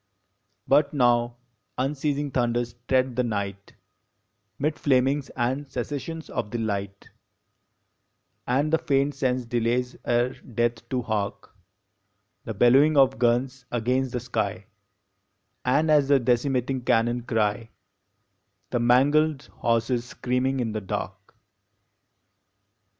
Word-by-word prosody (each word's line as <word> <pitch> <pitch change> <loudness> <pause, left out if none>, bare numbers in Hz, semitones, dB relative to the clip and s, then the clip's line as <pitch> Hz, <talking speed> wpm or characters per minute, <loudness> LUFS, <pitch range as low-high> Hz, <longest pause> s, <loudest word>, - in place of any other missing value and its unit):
But 145 +1 +3
now 120 -2 +2 0.4
unceasing 145 +1 -1
thunders 120 -2 0
tread 130 -1 +2
the 125 - +2
night, 100 -3 -4 0.8
Mid 150 +2 -1
flamings 135 +1 +2
and 130 +3 -1
cessations 145 +5 -5
of 105 - -4
the 120 - -3
light, 100 -3 -4 1.4
And 140 +5 +1
the 160 - +4
faint 140 -1 +1
sense 130 -2 -1
delays 120 +1 -1
ere 120 +1 +1
death 120 0 -3
to 125 -2 -1
hark 105 -2 -3 0.9
The 110 - -5
bellowing 135 +8 +5
of 135 -1 +4
guns 125 +1 +1
against 125 +2 0
the 125 - -1
sky, 125 +1 -3 1.0
And, 150 +5 +2
as 145 -2 +4
the 140 -1 +5
decimating 125 +1 0
cannon 120 0 +2
cry, 115 -1 -1 1.0
The 120 - 0
mangled 140 +5 +3
horses 115 +1 0
screaming 125 +2 -1
in 115 -2 -2
the 110 0 -3
dark. 95 - -6
125 Hz, 110 wpm, -25 LUFS, 120-135 Hz, 1.4 s, bellowing